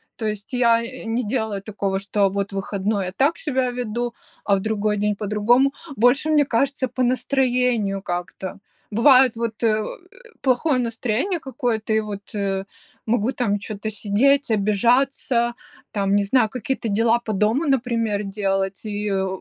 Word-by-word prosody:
То 225 - -5
есть 210 -1 -4
я, 235 -2 +4
э, 255 +3 -8
не 230 +2 -1
делаю 215 -3 -2
такого, 195 -2 -2
что 200 0 +1
вот 200 +1 -3
в - - -7
выходной 195 +1 -1
я 180 - -4
так 280 - +1
себя 260 -4 0
веду, 240 0 -3 0.3
а 200 - +3
в - - 0
другой 210 0 -1
день 210 0 0
по-другому. 220 +6 +2 0.2
Больше, 245 +7 +3
мне 300 -2 +4
кажется, 270 +2 0
по 255 +1 -2
настроению 250 -5 +1
как-то. 180 +1 -5 0.3
Бывает 255 +2 +5
вот, 230 -1 -4
э, 215 -1 +2 0.6
плохое 260 +1 +2
настроение 245 - -1
какое-то, 240 -6 -2
и 220 - +3
вот, 205 -2 -7
э, 195 -1 -1 0.4
могу 230 +1 +1
там 205 -6 -1
чё-то 210 +1 -5
сидеть, 225 +8 +2
обижаться, 235 +3 +2 0.4
там, 200 -1 +1
не 205 - +3
знаю, 220 +2 +2
какие-то 250 +1 -3
дела 225 +3 +3
по 225 -2 -4
дому, 215 - +1
например, 230 -6 0
делать. 195 0 -2
И, 210 0 -3
э, 190 0 0
220 Hz, 160 wpm, -22 LUFS, 205-250 Hz, 0.6 s, Бывает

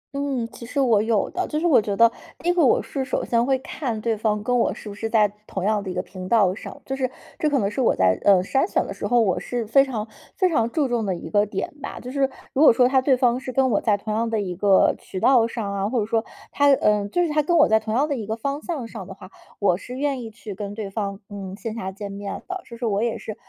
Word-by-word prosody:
嗯， 275 -4 -1
其 - - -12
实 265 +4 -3
我 230 -6 +4
有 220 -1 +1
的。 370 - -2
就 305 - -2
是 340 - -2
我 295 -10 +5
觉 205 -1 -2
得 230 0 +6 0.3
第 340 - -7
一 - - +4
个 350 - +3
我 260 - +4
是 270 -2 -3
首 260 - -2
先 235 0 +2
会 265 +1 +2
看 250 -3 -4
对 225 0 0
方 210 -1 -1
跟 245 +1 0
我 - - +2
是 - - -9
不 205 - -6
是 225 +2 -4
在 220 -2 +4 0.2
同 190 - -4
样 210 0 +1
的 195 - -6
一 180 - -3
个 180 - -1
频 185 -1 -9
道 200 -6 +4
上， - - -9
就 270 - -3
是 260 -2 -1 0.3
这 305 - +2
可 290 - +2
能 200 -6 +1
是 260 - -2
我 - - +3
在， 95 0 +2
呃， 190 -3 +5
筛 270 - +1
选 - - +1
的 - - -6
时 - - -4
候， 245 - +3
我 200 -6 +2
是 240 -2 -3
非 250 +6 +5
常 230 -6 -4 0.3
非 370 - +3
常 235 -9 +1
注 285 +1 0
重 240 -2 -1
的 190 -3 -1
一 - - -8
个 205 0 +3
点 195 +4 -4
吧。 - - -6
就 250 - -8
是 275 -1 +1 0.2
如 275 - +1
果 310 - +9
说 245 +1 +4
他 265 0 +3
对 260 -1 +3
方 245 -1 +2
是 260 -1 -6
跟 260 0 +2
我 205 - +2
在 210 -3 +2
同 215 +1 -4
样 225 +1 0
的 225 - 0
一 185 -3 -3
个 195 0 +4
渠 190 - -7
道 235 +1 +4
上 210 -4 -4
啊， 200 +1 -1
或 240 0 0
者 210 - 0
说 225 0 0 0.3
他 285 0 +3
呃， 210 -4 +1
就 355 +10 +1
是 335 - 0
他 300 0 +2
跟 340 +4 +1
我 310 - +6
在 220 0 +4
同 220 0 -3
样 280 +5 +2
的 290 - -1
一 220 -5 -5
个 220 - -2
方 280 +5 -3
向 290 -10 -4
上 190 - -8
的 195 - -9
话， 190 -1 -13 0.3
我 190 -4 +2
是 250 +6 -8
愿 280 -2 -1
意 225 - -7
去 215 -2 -9
跟 205 +1 -6
对 205 -3 -5
方， 200 -2 -3
嗯， 195 -2 -7
线 220 0 -5
下 190 -4 -4
见 200 0 -7
面 200 0 -6
的。 375 -1 -4
是 235 - -11
说 235 -1 -2
我 205 -1 0
也 235 -1 -1
是 215 - -7
225 Hz, 315 characters per minute, -23 LUFS, 205-265 Hz, 0.3 s, 果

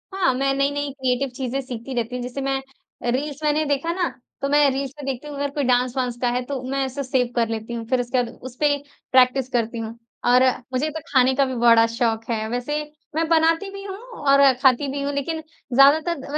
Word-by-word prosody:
हाँ, 370 -9 +2
मैं 270 +2 +1
नई-नई 285 +1 0
क्रिएटिव 260 0 0
चीज़ें 265 0 -2
सीखती 255 0 -7
रहती 240 +1 -2
हूँ। 250 - -4
जैसे 250 +3 -5
मैं 270 0 -1 0.4
अ, 240 - 0
रील्स 280 +3 -2
मैंने 300 +1 +2
देखा 285 +3 0
ना, 355 -1 0 0.3
तो 275 - -1
मैं 290 0 +5
रील्स 270 0 -3
में - - -7
देखती 270 +1 -4
हूँ, 295 - -7
अगर 285 0 -1
कोई 290 - -1
डांस 250 -1 +2
वांस 250 -2 -1
का 245 - +2
है, 245 +1 0
तो 275 -1 -4
मैं 275 0 0
इसे 270 +2 -4
सेव 255 -1 +1
कर 235 -2 +2
लेती 225 +1 -4
हूँ। 230 -1 -4
फिर 255 -1 +2
उसके 245 +1 0
बाद 235 - -6 0.2
उसपे 285 +4 +1 0.4
प्रैक्टिस 255 0 +4
करती 235 -2 -1
हूँ 225 0 -5 0.3
और 250 +1 +6 0.3
मुझे 275 +5 0
तो 315 +1 -5
खाने 260 -1 +4
का 275 - +3
भी 260 -1 -4
बड़ा 230 -1 +6
शौक 230 -1 -1
है। 220 -2 -1
वैसे 250 +6 -2 0.3
मैं 325 +1 +1
बनाती 330 +3 +3
भी 395 0 -8
हूँ 390 -1 -6 0.3
और 275 -1 +6
खाती 265 +1 +4
भी 280 +1 -3
हूँ, 285 +1 -2
लेकिन 315 +3 -2 0.3
ज़्यादातर 285 +4 +4
270 Hz, 225 wpm, -23 LUFS, 245-285 Hz, 0.4 s, और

